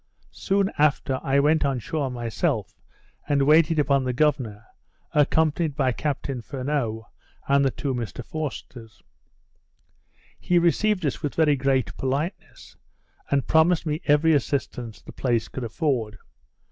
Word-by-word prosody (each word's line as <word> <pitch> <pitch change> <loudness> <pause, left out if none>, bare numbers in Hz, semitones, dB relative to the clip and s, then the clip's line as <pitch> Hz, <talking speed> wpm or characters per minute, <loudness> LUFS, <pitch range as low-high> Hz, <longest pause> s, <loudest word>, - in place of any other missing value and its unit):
Soon 195 0 0
after 140 -3 +2
I 135 +1 +2
went 155 +2 +3
on 140 -2 0
shore 140 +3 -3
myself, 120 - -2 0.6
and 140 -1 +3
waited 155 +2 +4
upon 140 -2 +2
the 125 -1 -1
governor, 120 -7 0 0.5
accompanied 155 +1 +2
by 135 -4 +1
Captain 135 -1 -3
Furneaux, 125 -3 -3 0.4
and 140 0 +4
the 135 - +3
two 135 +1 -3
Mr 120 -1 -5
Forsters. 130 -7 -7 1.4
He 180 - +1
received 185 +2 +2
us, 140 - -2
with 145 -3 -3
very 155 -3 +3
great 135 -1 0
politeness, 140 +8 -4 0.5
and 140 -2 +1
promised 160 +2 +3
me 155 0 -2
every 155 +2 +4
assistance 125 -5 -2
the - - -11
place 120 -4 -1
could 130 - -6
afford. 115 -3 -2
140 Hz, 135 wpm, -24 LUFS, 125-155 Hz, 1.4 s, waited